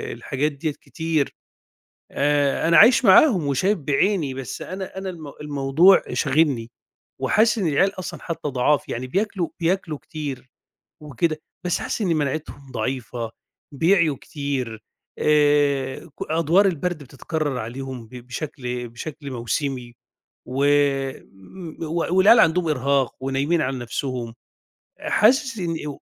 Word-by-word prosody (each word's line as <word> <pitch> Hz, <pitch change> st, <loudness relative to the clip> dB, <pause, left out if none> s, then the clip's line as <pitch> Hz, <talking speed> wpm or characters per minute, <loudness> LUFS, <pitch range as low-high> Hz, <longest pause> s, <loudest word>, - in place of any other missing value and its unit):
الحاجات 145 Hz, +3 st, -2 dB
ديّة 150 Hz, +2 st, -3 dB
كتير. 160 Hz, -1 st, -2 dB, 0.8 s
آآ 145 Hz, +1 st, +1 dB
أنا 170 Hz, -, +5 dB
عايش 240 Hz, +2 st, +7 dB
معاهم 190 Hz, -, +6 dB
وشايف 185 Hz, +9 st, +1 dB
بعيني، 150 Hz, +1 st, +1 dB
بس 135 Hz, -1 st, -6 dB
أنا 190 Hz, 0 st, -6 dB
أنا 190 Hz, 0 st, -4 dB
المو 155 Hz, -5 st, -8 dB
الموضوع 150 Hz, +6 st, +4 dB
شاغلني 135 Hz, -5 st, +1 dB, 0.5 s
وحاسس 225 Hz, +2 st, +3 dB
إن 190 Hz, -5 st, 0 dB
العيال 190 Hz, +6 st, +1 dB
أصلًا 185 Hz, -, -6 dB
حتّى 165 Hz, -3 st, -4 dB
ضعاف، 135 Hz, +3 st, +1 dB
يعني 130 Hz, +2 st, -4 dB
بياكلوا 195 Hz, +2 st, -1 dB
بياكلوا 170 Hz, -2 st, -1 dB
كتير 140 Hz, -4 st, -7 dB, 0.5 s
وكده 155 Hz, +2 st, -2 dB, 0.2 s
بس 175 Hz, -, 0 dB
حاسس -, -, -3 dB
إن 195 Hz, -, +1 dB
مناعتهم 140 Hz, -2 st, -3 dB
ضعيفة 115 Hz, -1 st, -3 dB, 0.4 s
بيعيوا 165 Hz, -2 st, +3 dB
كتير. 130 Hz, -7 st, -4 dB, 0.4 s
آآ 145 Hz, -2 st, +2 dB
ك 160 Hz, -, -17 dB, 0.2 s
أدوار 165 Hz, +5 st, +3 dB
البارد 175 Hz, -2 st, -2 dB
بتتكرر 145 Hz, +1 st, -3 dB
عليهم 125 Hz, +1 st, -6 dB
ب 125 Hz, -, -13 dB
بشكل 125 Hz, -1 st, -5 dB
بشكل 140 Hz, +3 st, -8 dB
موسمي 125 Hz, 0 st, -3 dB, 0.5 s
و -, -, -7 dB, 1.3 s
و 170 Hz, +3 st, -1 dB
والعيال 220 Hz, +5 st, +7 dB
عندهم 170 Hz, -2 st, +3 dB
إرهاق 140 Hz, -2 st, +1 dB
ونايمين 135 Hz, +5 st, 0 dB
على 130 Hz, -2 st, -1 dB
نفسهم 120 Hz, -1 st, -4 dB, 0.7 s
حاسس 245 Hz, +1 st, +2 dB
إن 170 Hz, -3 st, -2 dB
إو 145 Hz, -, -7 dB
145 Hz, 125 wpm, -23 LUFS, 130-170 Hz, 1.3 s, عايش